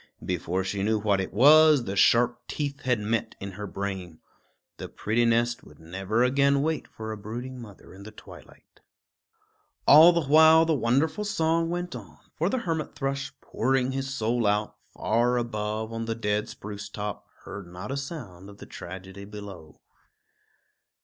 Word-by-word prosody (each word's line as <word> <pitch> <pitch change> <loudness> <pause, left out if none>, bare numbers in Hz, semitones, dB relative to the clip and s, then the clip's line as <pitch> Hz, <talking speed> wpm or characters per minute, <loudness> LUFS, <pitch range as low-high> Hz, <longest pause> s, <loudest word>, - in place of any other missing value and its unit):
Before 90 +1 -2
she 95 +1 -3
knew 110 +2 +1
what 100 -2 +1
it 95 - -5
was, 150 +3 +6
the 100 -3 -4
sharp 120 +4 +3
teeth 140 -2 -4
had 125 -3 +1
met 110 +2 -2
in 100 0 -6
her 105 +2 -7
brain. 95 -4 -5 0.6
The - - -7
pretty 115 +3 0
nest 120 +1 +1
would - - -16
never 95 +8 -1
again 140 +2 +3
wait 160 0 -2
for 110 0 -7
a 110 - -5
brooding 120 +5 -7
mother 105 -6 -13
in 95 - -13
the 105 - -9
twilight. 105 - -16 1.1
All 160 +4 +9
the 170 -3 0
while 160 +3 +6
the 160 - +1
wonderful 140 - +1
song 165 -4 0
went 175 0 -4
on; - - -11 0.2
for 170 +4 0
the 260 - -1
hermit 165 - -3
thrush, 135 -1 -3
pouring 130 +1 0
his 135 0 -3
soul 115 -3 0
out, 105 +1 0 0.2
far 120 +3 +1
above 110 -1 -3
on 115 0 -3
the 115 0 -2
dead 105 -1 -1
spruce 100 0 -8
top, 105 -1 -6 0.2
heard 100 -2 -8
not 90 +6 -8
a - - -2
sound 115 - -7
of 100 - -13
the - - -11
tragedy 95 +2 -9
below. 100 -6 -11
115 Hz, 170 wpm, -26 LUFS, 100-140 Hz, 1.1 s, All